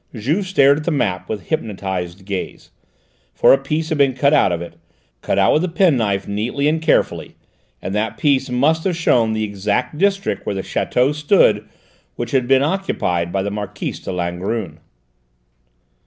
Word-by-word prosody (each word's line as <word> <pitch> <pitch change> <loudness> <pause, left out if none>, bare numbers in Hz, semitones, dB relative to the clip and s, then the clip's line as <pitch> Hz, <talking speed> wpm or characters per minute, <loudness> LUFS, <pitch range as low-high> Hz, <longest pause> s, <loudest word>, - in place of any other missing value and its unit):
Juve 150 - -1
stared 140 -6 +4
at - - -6
the - - +1
map 95 - -1
with 110 -2 -5
hypnotised 95 - -4
gaze; 95 -2 -6 0.6
for - - +6
a - - +5
piece 155 +4 -2
had 155 -3 -1
been 135 -2 +3
cut 140 +3 +2
out 140 -10 +4
of 85 - -1
it, 85 0 -9 0.4
cut - - -1
out 95 -1 +4
with 155 - +2
a 185 - -1
penknife 125 - +1
neatly 115 +8 -1
and 160 +1 +1
carefully, 160 - 0 0.5
and 95 - -4
that 105 +1 -2
piece 140 -2 +1
must 150 +6 +1
have 185 -3 0
shown 120 -9 +2
the 110 0 -1
exact 105 +8 -2
district 195 - 0
where 100 - -3
the 95 - -3
château 130 +4 0
stood 145 - +2 0.5
which - - -5
had 130 -3 +1
been 135 +1 +4
occupied 90 - -1
by 95 0 -1
the 100 - -3
Marquise 105 -1 -5
de - - -6
Langrune. 90 0 -3
120 Hz, 175 wpm, -19 LUFS, 100-150 Hz, 0.6 s, for